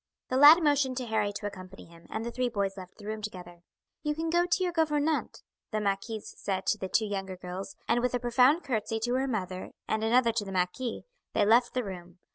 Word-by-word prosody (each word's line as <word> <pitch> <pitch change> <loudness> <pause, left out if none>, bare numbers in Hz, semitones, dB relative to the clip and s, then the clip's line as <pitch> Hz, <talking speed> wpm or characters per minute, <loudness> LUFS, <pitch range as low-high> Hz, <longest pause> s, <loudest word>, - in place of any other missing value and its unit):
The 255 - -1
lad 305 +5 +9
motioned 285 -4 +2
to 255 - -2
Harry 220 -3 0
to 205 - -6
accompany 195 -1 -8
him, 170 0 -17
and 220 +1 -4
the 235 - -3
three 250 0 -1
boys 200 -4 -1
left 185 -2 -11
the 205 - -12
room 215 0 -4
together. 180 -4 -8 0.4
"You 300 0 -1
can 325 +1 -2
go 345 +1 +3
to 365 +2 +1
your 355 -1 -1
gouvernante," 310 -1 0 0.3
the 215 - -1
marquise 205 +2 -3
said 190 -1 -2
to - - +1
the 190 - -4
two 220 - +2
younger 195 -2 -4
girls; 185 +2 -7
and 235 - +3
with 250 0 0
a - - 0
profound 250 +7 +4
curtsy 225 -4 -2
to 240 +2 0
her 260 - +2 0.7
and 220 0 -1
another 235 +1 +4
to 225 -2 -1
the 195 - -7
marquis, 190 +7 -2 0.3
they - - +3
left 240 +4 +4
the 250 - +1
room. 180 -3 -8
220 Hz, 225 wpm, -29 LUFS, 195-255 Hz, 0.7 s, lad